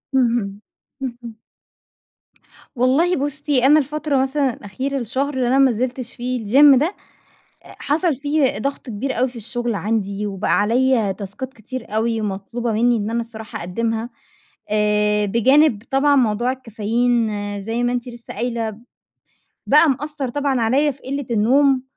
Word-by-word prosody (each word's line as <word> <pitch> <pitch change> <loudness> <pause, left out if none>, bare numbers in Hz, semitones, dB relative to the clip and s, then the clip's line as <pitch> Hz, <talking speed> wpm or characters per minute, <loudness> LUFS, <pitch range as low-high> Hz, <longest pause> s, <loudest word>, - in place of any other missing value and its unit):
اهم. 230 -5 +1 0.4
اهم. 240 -3 -6 1.4
والله 275 +9 +3
بُصي، 285 -2 0
أنا 300 +3 +6
الفترة 295 -1 -1
مثلًا 270 -1 0
الأخيرة 260 +9 -4
الشهر 265 +5 -2
اللي 255 -2 0
أنا 265 +2 +3
ما 270 -2 +5
نزلتش 245 +1 -3
فيه 245 -2 -3
الgym 275 +4 +7
ده 335 +7 -1 0.7
أ - - -14
حصل 310 0 0
فيه 285 -4 0
ضغط 275 +3 -4
كبير 240 +3 -3
أوي 255 +1 +2
في 245 - -13
الشغل 240 +1 -3
عندي 205 -1 -2
وبقى 195 0 -3
عليّا 230 -1 +2
تاسكات 205 +7 -7
كتير 225 0 -8
أوي، 225 0 0
مطلوبة 215 +4 -3
مني 235 +2 +2
إن 210 +1 -2
أنا 235 +1 0
الصراحة 220 -1 -8
أقدّمها. 225 +6 -2 0.6
آآ، 210 0 +2
بجانب 235 +2 +3
طبعًا 285 +1 +3
موضوع 240 +1 +2
الكافيين 235 -1 0 0.3
زي 225 +3 -2
ما 245 0 +1
أنتِ 245 0 -3
لسه 235 -1 -10
قايلة 230 -3 -3 0.9
بقى 300 +1 +5
مأثر 290 0 -3
طبعًا 280 -2 0
عليّا 270 +6 +2
في 270 - -11
قلة 275 0 -4
النوم، 260 +5 +3
245 Hz, 145 wpm, -20 LUFS, 220-270 Hz, 1.4 s, الgym